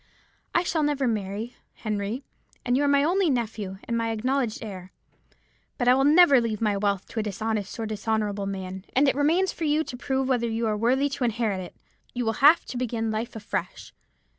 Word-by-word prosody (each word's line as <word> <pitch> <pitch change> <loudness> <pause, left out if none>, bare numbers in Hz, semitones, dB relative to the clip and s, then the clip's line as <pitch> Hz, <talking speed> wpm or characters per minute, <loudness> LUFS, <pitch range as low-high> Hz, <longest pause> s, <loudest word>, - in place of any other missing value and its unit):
'I 345 - +4
shall 330 -2 0
never 290 -3 +1
marry, 215 +1 -3 0.2
Henry, 215 +4 -3 0.4
and 245 0 +2
you 280 - +2
are - - +2
my 280 0 +4
only 360 +3 +2
nephew, 220 -6 -2
and 235 - -3
my 230 0 0
acknowledged 240 +1 -1
heir. 185 -4 -8 0.9
But 245 - -1
I 250 - +7
will 270 +1 +3
never 295 -4 +7
leave 220 -3 -2
my 210 -2 +1
wealth 200 -1 0
to 230 - -4
a - - +2
dishonest 215 +1 -3
or 225 - -2
dishonourable 210 -2 -2
man, 190 -1 -5
and 275 +3 +4
it - - +4
remains 330 +7 +2
for 325 - -4
you 305 +1 +2
to 250 - -7
prove 265 +1 -1
whether 240 -3 +1
you 225 +1 -1
are 215 -1 +1
worthy 250 +6 +2
to 275 -1 -4
inherit 225 -4 0
it. 180 - -8 0.4
You 245 -1 -1
will 225 - +1
have 300 +4 +7
to 250 - -6
begin 230 -2 -2
life 225 +2 -3
afresh. 210 -2 -5
230 Hz, 205 wpm, -26 LUFS, 210-270 Hz, 0.9 s, I